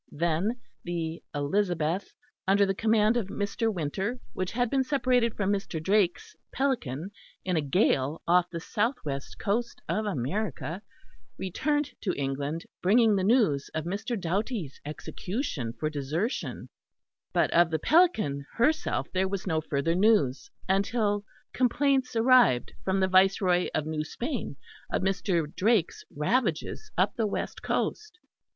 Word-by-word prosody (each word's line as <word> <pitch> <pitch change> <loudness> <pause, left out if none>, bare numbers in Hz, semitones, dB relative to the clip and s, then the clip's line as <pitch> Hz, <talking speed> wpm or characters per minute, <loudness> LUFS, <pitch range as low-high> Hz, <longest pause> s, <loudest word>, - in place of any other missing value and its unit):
Then 170 +9 0 0.2
the 165 -1 -3
Elizabeth, 170 +3 0 0.4
under 200 +1 +5
the 195 - 0
command 220 +2 +3
of 220 -6 -1
Mr. 205 +3 -1
Winter, 190 - -2 0.2
which 185 0 -3
had 245 +1 +1
been 265 +3 +1
separated 255 -4 +1
from 200 -1 +1
Mr. 195 -4 -3
Drake's 190 +1 +1 0.2
Pelican 200 - -1 0.3
in 185 -1 0
a 160 - +2
gale 145 -2 +1
off 180 +1 +4
the 170 - -5
south 225 +9 0
west 140 -2 -5
coast 230 +3 -1
of 210 +6 -1
America, 175 - -3 0.6
returned 290 - -1
to 185 - -1
England, 140 +4 -2 0.2
bringing 220 +3 +4
the 190 - +1
news 190 - +3
of 160 - -1
Mr. 200 +5 -3
Doughty's 190 - -2
execution 155 - -4
for 155 - 0
desertion; 155 - -3 0.6
but - - +2
of 170 -1 +5
the 160 - 0
Pelican 215 - +2
herself 305 +7 +1
there 190 +1 +2
was 190 -1 -4
no 160 -4 0
further 150 +1 0
news 185 - +2 0.2
until 205 +1 +1 0.3
complaints 265 0 +2
arrived 230 - +4
from 190 0 +1
the 190 - +3
Viceroy 185 -1 +4
of 155 - 0
New 155 -1 -2
Spain 235 - -4 0.4
of - - 0
Mr. 190 -3 +1
Drake's 210 -3 +1
ravages 170 - 0
up 190 +3 +2
the 225 -2 +1
west - - -4
coast. 430 -4 -2
190 Hz, 140 wpm, -28 LUFS, 160-225 Hz, 0.6 s, under